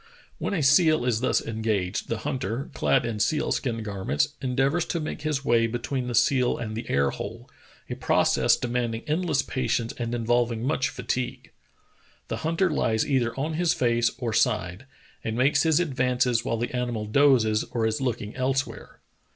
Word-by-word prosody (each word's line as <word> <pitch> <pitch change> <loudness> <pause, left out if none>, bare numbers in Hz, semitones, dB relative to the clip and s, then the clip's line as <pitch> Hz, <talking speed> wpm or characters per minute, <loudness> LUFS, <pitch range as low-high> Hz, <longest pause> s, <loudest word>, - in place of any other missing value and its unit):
When 200 - -2
a 160 - 0
seal 155 0 +4
is 120 -3 +1
thus 130 - +1
en 110 -1 -4
gaged 100 -5 -1
the 115 - -2
hunter, 125 +2 -3
clad 130 -3 +2
in 115 -2 -3
seal 150 +8 +1
skin 115 -4 -1
garments, 95 -8 -1
endeavors 135 +5 +1
to 170 - -2
make 155 0 -5
his 150 -3 -2
way 115 -1 +3
between 125 +2 -3
the 120 - -2
seal 125 +2 +3
and 110 -2 -5
the 115 - -6
air 70 0 +2
hole, - - -7 0.4
a - - -4
process - - +3
demanding 120 -2 -2
endless 155 -3 0
patience 120 -3 -1
and 120 -1 -2
inv^olving 120 -1 0
much 135 +1 0
fatigue. 125 0 -4 0.8
The - - -2
hunter 165 +3 0
lies 110 -7 +1
either 130 -3 0
on 155 +3 -1
his 170 +1 +1
face 120 -1 +2
or 120 -4 -3
side, 105 -1 0 0.4
and 110 +1 -3
makes 135 +4 +3
his 160 -1 +3
advances 125 -6 +1
while 115 -2 -1
the 120 +2 -3
animal 120 -3 -2
dozes 110 -3 +3
or 115 -2 -2
is 110 +3 -1
looking 115 -5 -3
elsewhere. 135 +1 -3
125 Hz, 175 wpm, -26 LUFS, 115-135 Hz, 0.8 s, seal